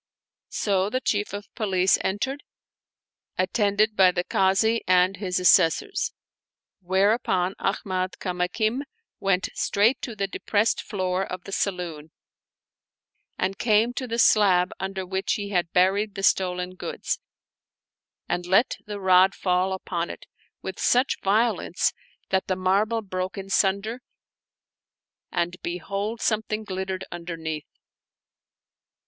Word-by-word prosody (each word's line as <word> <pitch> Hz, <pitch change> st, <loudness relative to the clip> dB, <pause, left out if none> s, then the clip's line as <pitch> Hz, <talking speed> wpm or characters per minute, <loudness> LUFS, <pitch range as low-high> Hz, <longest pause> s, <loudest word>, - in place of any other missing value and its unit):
So 195 Hz, -1 st, 0 dB
the 255 Hz, -, -1 dB
Chief 210 Hz, -5 st, -1 dB
of 205 Hz, +1 st, -8 dB
Police 190 Hz, -4 st, +2 dB
entered, 265 Hz, +9 st, -2 dB, 1.0 s
attended 205 Hz, +3 st, +1 dB
by 190 Hz, -2 st, +6 dB
the 180 Hz, 0 st, -1 dB
Kazi 195 Hz, +6 st, +2 dB
and 185 Hz, +1 st, +4 dB
his 185 Hz, -2 st, -1 dB
Assessors; 180 Hz, -, +3 dB, 0.7 s
whereupon 190 Hz, 0 st, +1 dB
Ahmad 185 Hz, -1 st, -1 dB
Kamakin 190 Hz, +7 st, -1 dB, 0.4 s
went 195 Hz, -1 st, +1 dB
straight 225 Hz, +6 st, +2 dB
to 235 Hz, -, -5 dB
the 200 Hz, -1 st, -1 dB
depressed 205 Hz, +2 st, 0 dB
floor 185 Hz, -2 st, -2 dB
of 185 Hz, -2 st, -6 dB
the 195 Hz, -, -9 dB
saloon 175 Hz, -6 st, -3 dB, 1.3 s
and 190 Hz, +1 st, -2 dB
came 225 Hz, +1 st, +3 dB
to 255 Hz, 0 st, -4 dB
the 230 Hz, 0 st, -3 dB
slab 195 Hz, -6 st, +4 dB
under 190 Hz, 0 st, -4 dB
which 190 Hz, +1 st, -1 dB
he. 205 Hz, -3 st, -3 dB
had 175 Hz, -4 st, 0 dB
buried 195 Hz, +3 st, +2 dB
the 195 Hz, -, -5 dB
stolen 180 Hz, -1 st, +1 dB
goods, 185 Hz, -, -4 dB, 1.1 s
and 175 Hz, 0 st, -2 dB
let 195 Hz, +7 st, +3 dB
the 205 Hz, -1 st, -5 dB
rod 190 Hz, 0 st, +5 dB
fall 185 Hz, 0 st, +1 dB
upon 175 Hz, -2 st, -3 dB
it -, -, -9 dB, 0.4 s
with 190 Hz, -, -6 dB
such 250 Hz, +2 st, +2 dB
violence 220 Hz, +4 st, +1 dB, 0.4 s
that 190 Hz, 0 st, 0 dB
the 185 Hz, -, 0 dB
marble 200 Hz, +5 st, +1 dB
broke 185 Hz, -1 st, -4 dB
in 195 Hz, 0 st, -7 dB
sunder, 200 Hz, +6 st, +1 dB, 1.3 s
and 175 Hz, 0 st, -1 dB
behold 200 Hz, +6 st, -4 dB
something 215 Hz, 0 st, -1 dB
glittered 190 Hz, -1 st, -4 dB
underneath. 165 Hz, -3 st, -5 dB
190 Hz, 120 wpm, -25 LUFS, 180-210 Hz, 1.3 s, by